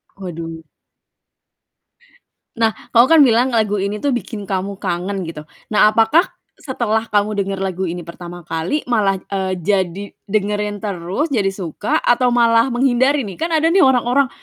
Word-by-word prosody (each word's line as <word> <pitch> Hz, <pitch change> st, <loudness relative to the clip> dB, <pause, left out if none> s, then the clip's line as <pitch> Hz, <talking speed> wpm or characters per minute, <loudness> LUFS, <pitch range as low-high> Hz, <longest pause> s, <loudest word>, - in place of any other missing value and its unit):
Waduh. 165 Hz, -3 st, -7 dB, 1.9 s
Nah, 225 Hz, -1 st, +3 dB, 0.2 s
kau 235 Hz, +2 st, +6 dB
kan 320 Hz, -3 st, +7 dB
bilang 245 Hz, +1 st, +3 dB
lagu 210 Hz, -4 st, 0 dB
ini 200 Hz, +2 st, -2 dB
tuh 280 Hz, +3 st, -1 dB
bikin 220 Hz, -4 st, -5 dB
kamu 195 Hz, +1 st, -3 dB
kangen 185 Hz, +1 st, -3 dB
gitu. 160 Hz, -2 st, -7 dB, 0.3 s
Nah, 210 Hz, 0 st, +6 dB
apakah 225 Hz, +10 st, +4 dB, 0.3 s
setelah 230 Hz, -5 st, -2 dB
kamu 210 Hz, 0 st, +1 dB
denger 195 Hz, -1 st, -2 dB
lagu 190 Hz, -1 st, -3 dB
ini 175 Hz, 0 st, -6 dB
pertama 175 Hz, 0 st, -10 dB
kali 165 Hz, -, -2 dB
malah, 205 Hz, -5 st, +1 dB
eee, 190 Hz, -1 st, -2 dB
jadi 190 Hz, +1 st, -1 dB, 0.3 s
dengerin 210 Hz, 0 st, -1 dB
terus, 200 Hz, -, -3 dB
jadi 200 Hz, -4 st, +1 dB
suka 190 Hz, 0 st, -2 dB
atau 245 Hz, +1 st, +2 dB
malah 235 Hz, 0 st, +3 dB
menghindari 260 Hz, +2 st, +2 dB
nih? 195 Hz, -, -9 dB
Kan 330 Hz, -, 0 dB
ada 325 Hz, +2 st, +2 dB
nih 385 Hz, -, +5 dB
orang-orang, 260 Hz, 0 st, +3 dB
210 Hz, 150 wpm, -18 LUFS, 190-245 Hz, 1.9 s, kan